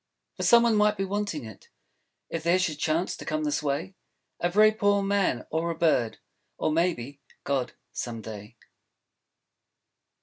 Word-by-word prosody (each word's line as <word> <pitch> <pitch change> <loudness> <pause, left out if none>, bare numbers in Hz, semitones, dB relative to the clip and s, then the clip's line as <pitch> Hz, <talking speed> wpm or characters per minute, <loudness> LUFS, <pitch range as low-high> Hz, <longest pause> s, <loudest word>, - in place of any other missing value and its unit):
For - - -7
some 235 0 +6
one 230 -2 +3
might 210 0 +3
be 195 - -1
wanting 200 - -3
it, 110 -3 -12 0.6
If 165 - -4
there 170 +3 +3
should 160 -5 -1
chance 160 +4 0
to - - -9
come 155 0 -2
this 150 0 0
way, 150 +6 -2 0.5
A 175 - +1
very 215 +4 +6
poor 205 -2 +2
Man; 195 -10 +1
or 165 +2 0
a 165 - -2
Bird; 155 -9 +2 0.4
Or - - 0
maybe, 145 -5 -1 0.2
God, 130 -3 -1 0.2
some 115 -2 -4
day. 105 +1 -9
165 Hz, 160 wpm, -27 LUFS, 140-200 Hz, 0.6 s, some